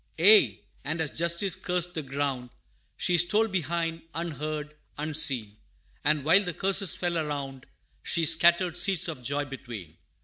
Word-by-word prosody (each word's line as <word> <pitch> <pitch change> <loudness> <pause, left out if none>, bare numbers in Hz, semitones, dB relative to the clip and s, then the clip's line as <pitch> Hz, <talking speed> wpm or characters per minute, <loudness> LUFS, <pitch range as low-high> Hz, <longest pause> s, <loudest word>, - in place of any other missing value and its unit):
Aye, 205 +6 +6 0.2
and 155 +3 -3
as 160 -3 -2
Justice 170 +3 0
cursed 180 -1 -1
the 160 - -3
ground, 135 -3 -3 0.5
She 175 -1 +1
stole 210 +6 +3
behind, 170 -3 -2
unheard, 155 -2 -4 0.2
unseen 135 -8 -1 0.5
And 150 -1 +1
while 185 +7 +4
the 180 -3 -5
curses 195 -1 +1
fell 175 -2 -1
around, 140 -4 -5 0.3
She 165 -1 -1
scattered 170 +2 +3
seeds 185 -2 +3
of 125 - -6
joy 140 +3 -2
between. 120 - -9
160 Hz, 140 wpm, -27 LUFS, 145-175 Hz, 0.5 s, Aye